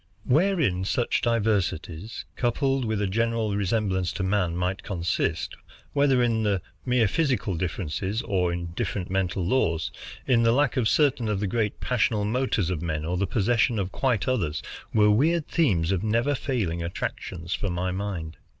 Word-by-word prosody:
Wherein 145 - +2
such 120 +5 0
diversities, 105 -4 -1
coupled 135 +1 +1
with 110 -2 0
a - - +2
general 115 +1 0
resemblance 95 -2 0
to 95 - -3
man, 95 -3 +1
might 90 +2 -1
consist, 85 -3 -1 0.4
whether 140 -3 +3
in 110 -4 +1 0.2
mere 125 -3 +3
physical 130 - 0
differences 95 +5 -2
or 90 -5 +1
in 85 -1 -4
different 95 -4 -3
mental 95 -1 0
laws, 85 -8 +1 0.3
in 120 -3 +3
the 115 0 +4
lack 140 +1 +2
of 115 -4 +2
certain 135 -6 +2
of 105 -2 0
the 105 - -1
great 105 +1 -1
passional 110 -3 +1
motors 110 -5 0
of 85 -4 -2
men 80 -3 -2
or 90 +2 -1
the 95 +2 0
possession 120 +2 +2
of 95 -2 -2
quite 120 -7 0
others, 85 -13 0 0.3
were 105 -1 +5
weird 155 +8 +2
themes 95 - +2
of 95 -2 +1
never 115 +6 +1
failing 110 -12 -1
attractions 85 0 -4
for 100 - -2
my 90 +1 -1
mind. 90 -5 -4
105 Hz, 160 wpm, -26 LUFS, 90-120 Hz, 0.4 s, were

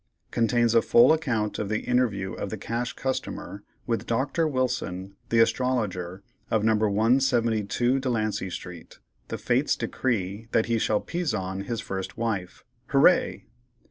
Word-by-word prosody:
Contains 120 0 +2
a 115 - +6
full 120 +7 +6
account 115 -9 -1
of 105 - -2
the 110 0 0
interview 105 -7 0
of - - -4
the - - -4
Cash 120 +2 -3
Customer 130 -6 -4 0.2
with 115 -1 -2
Doctor 140 +7 +1
Wilson, 100 -9 -2
the 115 - +2
Astrologer, 105 -7 0 0.3
of 110 -2 +1
No. 110 0 +4
172 115 +2 +2
Delancey 110 -6 -1
Street. 90 -2 -9 0.3
The - - -4
Fates - - +1
decree 110 -3 -2
that 110 - +3
he 115 -1 0
shall 105 -1 +1
"pizon 100 - -3
his 115 0 -3
first 95 -1 -5
Wife." 100 -6 -3 0.2
HOORAY!! - - +3
115 Hz, 140 wpm, -26 LUFS, 100-125 Hz, 0.3 s, a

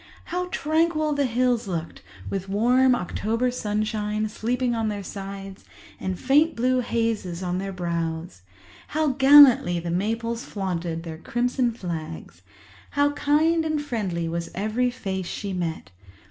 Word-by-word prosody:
How 360 +1 -3
tranquil 310 -1 +1
the 285 -2 +1
hills 245 -1 +1
looked, 170 -3 -4 0.3
with 195 - -4
warm 250 +5 +4
October 230 +4 -1
sunshine 215 -1 -1
sleeping 240 +3 -1
on 225 -1 -1
their 205 -1 -3
sides 195 0 -8 0.4
and 185 -1 -3
faint 295 +5 +3
blue 255 +2 +2
hazes 225 -7 -1
on 180 0 -1
their 195 0 -4
brows! 170 - -3 0.6
How 310 -1 +3
gallantly 265 -9 +7
the 170 0 -4
maples 230 +5 -1
flaunted 175 -4 -3
their 160 -2 -7
crimson 245 +4 0
flags! 160 - -6 0.5
How 285 0 +2
kind 310 +3 +2
and 310 -1 0
friendly 205 -12 -2
was 170 +1 -3
every 220 +6 0
face 190 -7 -4
she 200 -2 -4
met! 170 - -4
215 Hz, 135 wpm, -25 LUFS, 180-255 Hz, 0.6 s, gallantly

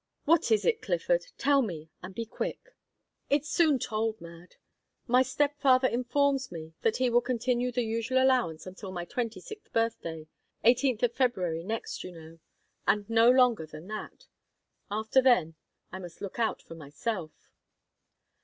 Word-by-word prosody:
"What 330 -3 +3
is 215 -2 +3
it, 460 -1 +2
Clifford? - - 0
Tell 280 0 +3
me, 165 -9 -5
and 185 +1 -9
be 230 - -3
quick." - - -6 0.5
"It's 290 +1 +1
soon 310 -3 +3
told, 220 -1 -2
Mad. 170 +1 -13 0.5
My 250 +1 +4
step 285 +3 0
father 260 -1 +5
informs 270 +3 0
me 160 -1 -8
that 225 - +1
he 255 -1 +1
will 240 +1 +4
continue 245 0 0
the 245 0 0
usual 230 +3 -1
allowance 255 -12 +2
until 190 +1 -8
my 175 -2 -5
twenty 230 0 -3
sixth 415 - -11
birthday 170 -9 -2 0.4
eighteenth 250 0 +3
of 240 -1 +2
February 185 -11 0
next, 220 +4 -4
you 185 - -7
know 165 0 -13 0.5
and 205 -1 +2
no 230 +1 +6
longer 250 -9 +4
than 155 +2 -11
that. 215 0 -7 0.6
After 220 +5 +2
then, 240 -11 +3 0.4
I 190 - -6
must 175 -2 -10
look 200 +3 -7
out 230 - 0
for - - -11
myself." 160 +3 -6
230 Hz, 160 wpm, -29 LUFS, 180-255 Hz, 0.6 s, no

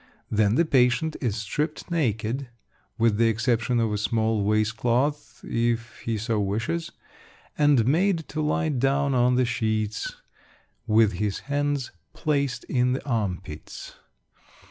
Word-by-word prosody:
Then 105 0 +3
the 170 - +3
patient 130 +2 +2
is 120 -7 0
stripped 145 - -3
naked 125 -4 -1 0.5
(with 115 -2 +2
the 115 +1 +4
exception 120 +1 +1
of 110 -2 +1
a 105 - -1
small 110 -1 +1
waist 110 +1 +1
cloth, 135 +6 -1
if 115 0 -1
he 115 -1 -2
so 110 +1 -1
wishes), 110 +12 -2 0.6
and 145 -6 +4
made 165 +4 +2
to 155 - -3
lie 155 +2 0
down 140 +1 +1
on 125 0 +3
the 125 0 +3
sheets, 110 -3 -2 0.7
with 110 -1 +4
his 100 +1 -2
hands 145 -1 -1 0.2
placed 140 -5 -1
in 125 -1 +1
the 130 - -4
arm 105 -9 -1
pits. 75 -5 -9
120 Hz, 140 wpm, -25 LUFS, 110-140 Hz, 0.7 s, the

